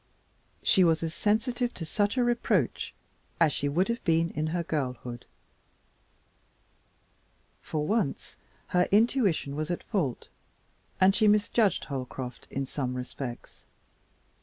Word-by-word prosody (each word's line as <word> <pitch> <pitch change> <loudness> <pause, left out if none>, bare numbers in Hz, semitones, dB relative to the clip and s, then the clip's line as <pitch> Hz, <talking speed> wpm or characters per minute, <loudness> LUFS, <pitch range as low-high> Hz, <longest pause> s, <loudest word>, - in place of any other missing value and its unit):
She 190 - +5
was 165 -1 +3
as 165 0 -2
sensitive 240 +5 0
to 165 - -4
such 205 +7 0
a 250 - +4
reproach 240 -1 +1 0.5
as 160 -4 +4
she 145 - -1
would 175 +7 +2
have 235 +1 -2
been 165 0 +2
in 155 +1 -2
her 170 +2 -1
girlhood. 125 -6 -4 2.3
For 150 -1 -2
once 210 -6 -1 0.3
her 180 0 +2
intuition 205 - +2
was 155 +1 -3
at 175 - -2
fault, 160 - -2 0.7
and 190 +1 +6
she 215 +1 +3
misjudged 210 -1 +3
Holcroft 130 -2 -6
in 135 0 -2
some 130 -2 -3
respects. 125 0 -7
165 Hz, 125 wpm, -28 LUFS, 140-210 Hz, 2.3 s, and